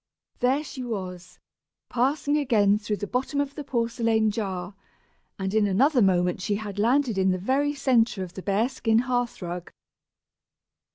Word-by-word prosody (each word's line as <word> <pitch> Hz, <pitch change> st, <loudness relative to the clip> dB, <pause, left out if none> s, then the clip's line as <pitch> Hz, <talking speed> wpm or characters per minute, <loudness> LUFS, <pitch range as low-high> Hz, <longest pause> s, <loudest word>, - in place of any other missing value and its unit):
There 265 Hz, +4 st, +2 dB
she 265 Hz, -3 st, -7 dB
was, 185 Hz, -6 st, -6 dB, 0.5 s
passing 280 Hz, +4 st, +1 dB
again 215 Hz, -8 st, +3 dB
through 210 Hz, 0 st, -3 dB
the 205 Hz, -, -4 dB
bottom 260 Hz, +6 st, -2 dB
of 285 Hz, -1 st, -1 dB
the 295 Hz, -, -6 dB
porcelain 230 Hz, -4 st, +1 dB
jar, 195 Hz, -3 st, -4 dB, 0.6 s
and 190 Hz, 0 st, -3 dB
in 215 Hz, -1 st, +3 dB
another 250 Hz, +7 st, +3 dB
moment 180 Hz, -2 st, +2 dB
she 205 Hz, +2 st, 0 dB
had 205 Hz, -1 st, -5 dB
landed 240 Hz, -1 st, +2 dB
in 190 Hz, 0 st, +3 dB
the 185 Hz, -, +1 dB
very 275 Hz, +9 st, 0 dB
centre 235 Hz, -7 st, +2 dB
of 180 Hz, -1 st, -9 dB
the 190 Hz, -, -7 dB
bear 200 Hz, +4 st, +1 dB
skin 230 Hz, -4 st, 0 dB
hearth 245 Hz, -5 st, -1 dB
rug. 175 Hz, 0 st, -6 dB
220 Hz, 160 wpm, -26 LUFS, 195-260 Hz, 0.6 s, again